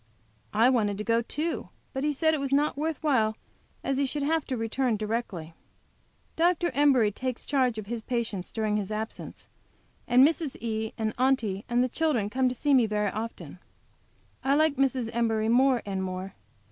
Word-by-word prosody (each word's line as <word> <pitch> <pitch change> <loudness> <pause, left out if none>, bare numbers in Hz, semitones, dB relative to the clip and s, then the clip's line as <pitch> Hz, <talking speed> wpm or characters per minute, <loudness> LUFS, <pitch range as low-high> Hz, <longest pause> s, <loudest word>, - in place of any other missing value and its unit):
I 225 +3 +5
wanted 210 -5 +1
to 210 - -3
go 230 +2 +2
too, 305 +8 -3 0.2
but 265 0 -2
he 300 - +2
said 315 +2 +2
it 310 - 0
was 275 -1 -3
not 290 +2 +2
worth 310 +2 -2
while, 225 -8 +2 0.5
as 270 0 0
he 280 - +2
should 290 +2 -2
have 320 +2 +1
to 260 - -3
return 225 +1 0
directly. 210 -7 -3 0.8
Dr. 345 0 +2
Embury 265 -6 +4
takes 255 +3 -4
charge 255 -5 +1
of 215 - -5
his 230 +2 -4
patients 220 -6 -3
during 215 -2 0
his 205 -1 -3
absence, 220 +1 -6 0.6
and 255 +3 +7
Mrs. 320 -3 -2
E. 220 -1 -3
and 220 -1 -1
Aunty 235 -7 +1
and 240 +1 +3
the - - +1
children 255 -7 0
come 260 +1 +2
to 250 - -4
see 290 +4 +1
me 250 -4 +5
very 210 -1 0
often. 225 +1 -6 0.8
I 270 +1 +3
like 310 0 +3
Mrs. 260 -3 +1
Embury 225 -2 +1
more 255 +1 +4
and 195 -2 -3
more. 185 +1 -4
240 Hz, 185 wpm, -27 LUFS, 215-275 Hz, 0.8 s, and